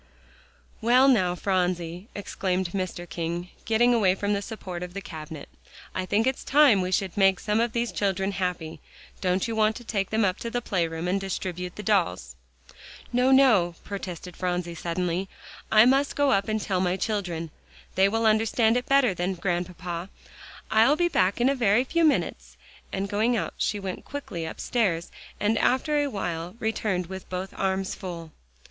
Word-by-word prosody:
"Well, 250 Hz, +4 st, +5 dB
now, 185 Hz, -9 st, +3 dB
Phronsie," 180 Hz, -1 st, -1 dB
exclaimed 190 Hz, -2 st, -2 dB
Mr. 185 Hz, -2 st, -4 dB
King, 170 Hz, +1 st, -4 dB, 0.2 s
getting 240 Hz, +2 st, +4 dB
away 195 Hz, -6 st, +3 dB
from 205 Hz, +1 st, -1 dB
the 200 Hz, -, 0 dB
support 190 Hz, -5 st, -7 dB
of 180 Hz, 0 st, -7 dB
the -, -, -2 dB
cabinet, 155 Hz, -4 st, -8 dB, 0.5 s
"I 185 Hz, 0 st, -3 dB
think 210 Hz, +4 st, +2 dB
it's 260 Hz, 0 st, -1 dB
time 280 Hz, -7 st, +5 dB
that -, -, 0 dB
we 185 Hz, -, -3 dB
should 190 Hz, -1 st, 0 dB
make 195 Hz, -2 st, +4 dB
some 210 Hz, +1 st, 0 dB
of 235 Hz, 0 st, 0 dB
these 235 Hz, -1 st, -1 dB
children 195 Hz, -1 st, 0 dB
happy. 180 Hz, -4 st, -3 dB, 0.4 s
Don't 185 Hz, +2 st, +1 dB
you 225 Hz, -, -3 dB
want 215 Hz, 0 st, +2 dB
to 240 Hz, -, -8 dB
take 200 Hz, -4 st, -2 dB
them 220 Hz, -1 st, +2 dB
up 185 Hz, 0 st, 0 dB
to 230 Hz, -, -4 dB
the 245 Hz, -, -1 dB
playroom 170 Hz, -6 st, -2 dB
and 195 Hz, +2 st, 0 dB
distribute 180 Hz, -2 st, -4 dB
the 210 Hz, -, -7 dB
dolls?" 175 Hz, -, 0 dB, 0.8 s
"No, 250 Hz, +2 st, +3 dB
no," 225 Hz, -11 st, +5 dB
protested 180 Hz, -3 st, -6 dB
Phronsie 180 Hz, -1 st, -2 dB
suddenly. 175 Hz, +2 st, -2 dB, 0.4 s
"I 215 Hz, +1 st, +7 dB
must 275 Hz, +3 st, +3 dB
go 285 Hz, -1 st, +3 dB
up 195 Hz, 0 st, +2 dB
and 215 Hz, 0 st, 0 dB
tell 190 Hz, -3 st, -1 dB
my 180 Hz, 0 st, +1 dB
children. 180 Hz, -6 st, -2 dB, 0.4 s
They 190 Hz, +1 st, +4 dB
will 225 Hz, +2 st, 0 dB
understand 220 Hz, +1 st, +3 dB
it 250 Hz, -, -3 dB
better 275 Hz, -6 st, +4 dB
then, 180 Hz, +2 st, -2 dB
Grandpapa. 175 Hz, 0 st, -3 dB, 0.6 s
I'll 225 Hz, +7 st, +5 dB
be 345 Hz, +2 st, +2 dB
back 190 Hz, -, +2 dB
in 240 Hz, -, +3 dB
a 275 Hz, -, +3 dB
very 235 Hz, -2 st, +3 dB
few 335 Hz, +5 st, 0 dB
minutes," 310 Hz, -3 st, 0 dB, 0.3 s
and 195 Hz, +1 st, -2 dB
going 220 Hz, +4 st, +1 dB
out -, -, -3 dB
she 205 Hz, -, 0 dB
went 190 Hz, -2 st, -5 dB
quickly 200 Hz, -13 st, -5 dB
upstairs, 170 Hz, -1 st, -1 dB, 0.3 s
and 215 Hz, +2 st, +1 dB
after 295 Hz, +4 st, +2 dB
a 290 Hz, -, 0 dB
while 175 Hz, -4 st, -4 dB
returned 215 Hz, -5 st, -1 dB
with 190 Hz, +2 st, -8 dB
both 185 Hz, +1 st, -4 dB
arms 190 Hz, 0 st, -1 dB
full. 170 Hz, -3 st, -7 dB
195 Hz, 180 wpm, -26 LUFS, 180-225 Hz, 0.8 s, I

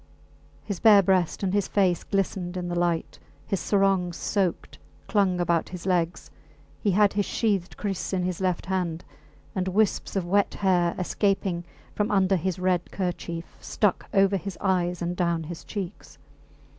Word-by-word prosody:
His 200 Hz, -4 st, -4 dB
bare 210 Hz, -3 st, +7 dB
breast 185 Hz, 0 st, +1 dB
and 190 Hz, -1 st, 0 dB
his 205 Hz, -2 st, +1 dB
face 185 Hz, -4 st, +2 dB
glistened 190 Hz, -2 st, -2 dB
in 175 Hz, -1 st, -3 dB
the -, -, -2 dB
light; 170 Hz, -2 st, -1 dB, 0.3 s
his 195 Hz, +5 st, -1 dB
sarong, 195 Hz, -3 st, +2 dB
soaked, 185 Hz, 0 st, -2 dB, 0.3 s
clung 195 Hz, -4 st, +2 dB
about 170 Hz, -1 st, +1 dB
his 180 Hz, -1 st, -8 dB
legs; 175 Hz, -2 st, 0 dB, 0.5 s
he 205 Hz, -, +1 dB
had 200 Hz, +1 st, +4 dB
his 205 Hz, -1 st, +1 dB
sheathed 200 Hz, -6 st, -1 dB
kriss 195 Hz, -3 st, -3 dB
in 185 Hz, -2 st, 0 dB
his 180 Hz, 0 st, -2 dB
left 180 Hz, -2 st, 0 dB
hand; 180 Hz, -3 st, -2 dB, 0.5 s
and 185 Hz, -1 st, -1 dB
wisps 205 Hz, +2 st, +1 dB
of 190 Hz, -3 st, 0 dB
wet 200 Hz, +3 st, +2 dB
hair, 180 Hz, -3 st, +2 dB
escaping 185 Hz, -2 st, 0 dB, 0.3 s
from 210 Hz, 0 st, 0 dB
under 195 Hz, -1 st, +3 dB
his 185 Hz, +1 st, -1 dB
red 180 Hz, -1 st, 0 dB
kerchief, 170 Hz, -3 st, -4 dB
stuck 205 Hz, -4 st, 0 dB
over 195 Hz, 0 st, +4 dB
his 195 Hz, 0 st, -6 dB
eyes 180 Hz, -2 st, 0 dB
and 175 Hz, +1 st, -2 dB
down 170 Hz, -2 st, 0 dB
his 165 Hz, +1 st, -7 dB
cheeks. 195 Hz, -5 st, -7 dB
185 Hz, 160 wpm, -26 LUFS, 175-195 Hz, 0.5 s, bare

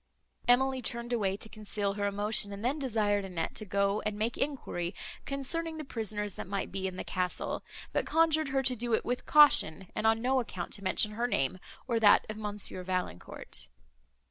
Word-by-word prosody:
Emily 260 Hz, +1 st, +4 dB
turned 235 Hz, +1 st, -2 dB
away 195 Hz, -4 st, 0 dB
to 220 Hz, -, -4 dB
conceal 210 Hz, -2 st, -3 dB
her 205 Hz, 0 st, -1 dB
emotion, 205 Hz, 0 st, +1 dB
and 200 Hz, +3 st, -6 dB
then 280 Hz, +5 st, 0 dB
desired 210 Hz, -6 st, +1 dB
Annette 180 Hz, -4 st, -3 dB
to 215 Hz, -, 0 dB
go, 200 Hz, +1 st, +1 dB
and 210 Hz, -1 st, -2 dB
make 220 Hz, +3 st, 0 dB
enquiry, 200 Hz, -11 st, -2 dB, 0.3 s
concerning 320 Hz, +4 st, -1 dB
the 310 Hz, -, -5 dB
prisoners, 210 Hz, -6 st, -3 dB
that -, -, -7 dB
might 200 Hz, 0 st, -3 dB
be 190 Hz, 0 st, -2 dB
in 185 Hz, -, -5 dB
the -, -, -4 dB
castle, 180 Hz, -1 st, -2 dB, 0.3 s
but -, -, 0 dB
conjured 315 Hz, -2 st, +3 dB
her 270 Hz, 0 st, +1 dB
to 255 Hz, -1 st, +2 dB
do 235 Hz, -1 st, 0 dB
it -, -, -3 dB
with 245 Hz, +1 st, -2 dB
caution, 195 Hz, -, +6 dB
and 220 Hz, -, +1 dB
on 225 Hz, 0 st, +4 dB
no 260 Hz, +3 st, +2 dB
account 185 Hz, -7 st, -5 dB
to 200 Hz, -, -5 dB
mention 210 Hz, +2 st, +2 dB
her 235 Hz, +3 st, -1 dB
name, 185 Hz, -, 0 dB, 0.3 s
or 235 Hz, -3 st, +1 dB
that 210 Hz, -2 st, +6 dB
of 215 Hz, -, -4 dB
Monsieur 205 Hz, -3 st, -4 dB
Valancourt. 180 Hz, -, -4 dB
215 Hz, 195 wpm, -31 LUFS, 200-250 Hz, 0.3 s, caution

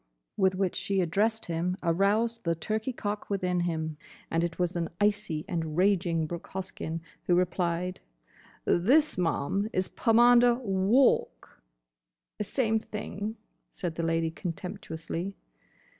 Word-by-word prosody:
with 190 Hz, -1 st, +3 dB
which 185 Hz, -1 st, 0 dB
she 195 Hz, -1 st, 0 dB
addressed 210 Hz, +6 st, +1 dB
him 175 Hz, +2 st, -1 dB
aroused 205 Hz, +7 st, +2 dB
the 170 Hz, -1 st, +1 dB
turkey 215 Hz, +8 st, -2 dB
cock 205 Hz, -3 st, -4 dB
within 180 Hz, -3 st, 0 dB
him, 160 Hz, -3 st, -2 dB, 0.3 s
and 165 Hz, +1 st, +2 dB
it 170 Hz, 0 st, -2 dB
was 180 Hz, 0 st, 0 dB
an 170 Hz, -1 st, -1 dB
icy 205 Hz, -6 st, 0 dB
and 160 Hz, -2 st, -3 dB
raging 180 Hz, -4 st, +2 dB
Brooke 170 Hz, +2 st, -6 dB
Hoskyn 180 Hz, -3 st, -5 dB, 0.3 s
who 175 Hz, -, +4 dB
replied, 180 Hz, 0 st, 0 dB, 0.7 s
"This, 275 Hz, -, +4 dB
ma'am, 180 Hz, +4 st, 0 dB
is 185 Hz, 0 st, -1 dB
Pomander 240 Hz, +1 st, +5 dB
Walk!" 225 Hz, +2 st, +2 dB, 0.8 s
"Same 220 Hz, +1 st, +1 dB
thing," 210 Hz, 0 st, -5 dB, 0.3 s
said 175 Hz, -6 st, -4 dB
the 165 Hz, -, -3 dB
Lady 165 Hz, 0 st, +1 dB
contemptuously. 170 Hz, +1 st, -5 dB
185 Hz, 125 wpm, -29 LUFS, 170-210 Hz, 0.8 s, Pomander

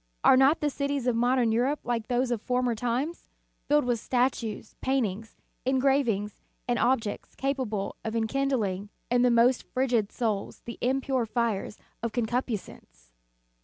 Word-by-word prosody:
Are -, -, +7 dB
not 270 Hz, +5 st, +4 dB
the 295 Hz, -1 st, +1 dB
cities 280 Hz, -2 st, -2 dB
of 250 Hz, -2 st, +2 dB
modern 245 Hz, 0 st, +2 dB
Europe 255 Hz, +6 st, +1 dB
like 230 Hz, -2 st, -2 dB
those 245 Hz, 0 st, +1 dB
of 230 Hz, -3 st, -1 dB
former 250 Hz, 0 st, +1 dB
times, 245 Hz, +8 st, -2 dB, 0.4 s
filled 295 Hz, -2 st, +3 dB
with 240 Hz, -2 st, +1 dB
statues, 245 Hz, -3 st, -1 dB
paintings, 225 Hz, -5 st, -1 dB, 0.3 s
engravings, 260 Hz, -6 st, +1 dB, 0.3 s
and 245 Hz, -1 st, +1 dB
objects 235 Hz, -4 st, 0 dB
capable 255 Hz, -8 st, -2 dB
of 220 Hz, 0 st, -3 dB
enkind 275 Hz, +5 st, 0 dB
ling 200 Hz, -2 st, -2 dB, 0.2 s
in 245 Hz, 0 st, +4 dB
the 250 Hz, -, +5 dB
most 240 Hz, +2 st, +4 dB
frigid 245 Hz, -5 st, 0 dB
souls 215 Hz, -5 st, -2 dB
the 235 Hz, -, -7 dB
impure 260 Hz, -1 st, 0 dB
fires 225 Hz, -3 st, -1 dB, 0.2 s
of 230 Hz, -2 st, -3 dB
concupiscence? 220 Hz, -, -4 dB
245 Hz, 145 wpm, -28 LUFS, 220-260 Hz, 0.4 s, Are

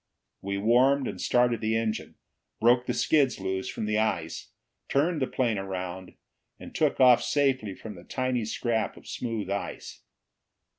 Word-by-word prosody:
We 100 Hz, 0 st, -3 dB
warmed 125 Hz, +6 st, +3 dB
and -, -, -5 dB
started 120 Hz, -1 st, +2 dB
the 110 Hz, 0 st, 0 dB
engine, 110 Hz, -1 st, -3 dB, 0.4 s
broke 120 Hz, +2 st, +4 dB
the -, -, 0 dB
skids 140 Hz, -8 st, +2 dB
loose 95 Hz, 0 st, -3 dB
from -, -, -4 dB
the 105 Hz, 0 st, +1 dB
ice, 85 Hz, -7 st, -2 dB, 0.4 s
turned 150 Hz, +3 st, +1 dB
the 130 Hz, -, +1 dB
plane 115 Hz, -6 st, 0 dB
around, 95 Hz, -1 st, -6 dB, 0.4 s
and -, -, -10 dB
took -, -, +1 dB
off 125 Hz, -2 st, +7 dB
safely 130 Hz, -9 st, 0 dB
from 110 Hz, +2 st, -9 dB
the 85 Hz, -, -12 dB
tiny 130 Hz, -3 st, -1 dB
scrap 110 Hz, 0 st, -1 dB
of -, -, -15 dB
smooth 110 Hz, -5 st, -4 dB
ice. 100 Hz, -, -5 dB
115 Hz, 155 wpm, -27 LUFS, 100-130 Hz, 0.4 s, off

